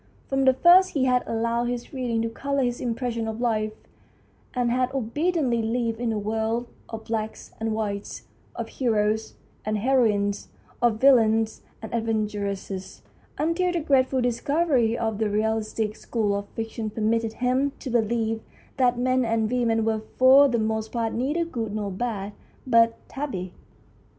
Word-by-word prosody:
From 270 0 +1
the 260 - +6
first 360 +6 +6
he 265 -2 +2
had 250 -1 +3
allowed 230 +1 0
his 240 +2 -4
reading 240 -4 -1
to 230 - -1
colour 280 +4 -1
his 245 -1 -1
impressions 235 -1 -2
of 220 0 -4
life, 215 -3 0 0.8
and 245 -1 +1
had 255 +1 +1
obediently 270 0 0
lived 230 0 -1
in 240 -1 0
a 220 - -1
world 220 +3 -1 0.2
of 225 -1 -6
blacks 220 -1 -4
and 225 0 -1
whites, 205 -2 -4 0.3
of - - -4
heroes 220 -3 0 0.3
and 215 0 -1
heroines, 210 -4 +1 0.3
of 235 -3 +2
villains 225 -4 +4 0.2
and 220 - -7
adventuresses, 205 -4 -3 0.3
until 335 +4 +1
the 345 - 0
grateful 265 -3 +2
discovery 245 -1 +1
of 220 -2 -2
the 220 -1 +1
realistic 215 0 -1
school 215 -4 -1
of 200 0 -4
fiction 225 0 -5
permitted 225 +1 0
him 255 +4 +1
to 260 - -6
believe 225 -1 0 0.4
that 250 -2 +3
men 255 +1 +2
and 225 -1 0
women 230 -3 +1
were 220 -1 0 0.2
for 265 +2 +7
the 240 -3 0
most 220 0 -1
part 230 -2 -1
neither 295 +8 0
good 225 -9 -4
nor 205 -2 -2
bad, 205 -1 -3 0.3
but 230 -2 +4
tabby. 195 -11 -5
230 Hz, 155 wpm, -25 LUFS, 220-255 Hz, 0.8 s, for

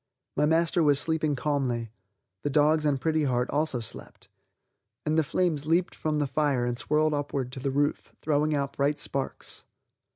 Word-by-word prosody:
My 150 +1 +3
master 165 +2 +2
was 145 -3 +4
sleeping 155 -2 0
calmly; 125 -6 -1 0.5
the - - -1
dogs 150 +1 +3
and 140 -2 +1
Pretty 155 +2 +1
Heart 125 -1 0
also 150 -3 0
slept, 110 - -9 0.8
and 155 0 +1
the 160 - +4
flames 155 -1 0
leaped 170 +3 +2
from 155 -1 -2
the 145 - +1
fire 135 -2 +1
and 120 0 -1
swirled 155 +4 +1
upward 140 -3 -2
to 130 - -6
the 135 - -1
roof, 145 +2 0
throwing 150 0 +1
out 140 -1 -1
bright 140 +1 +1
sparks. 135 -1 -4
145 Hz, 170 wpm, -27 LUFS, 135-155 Hz, 0.8 s, was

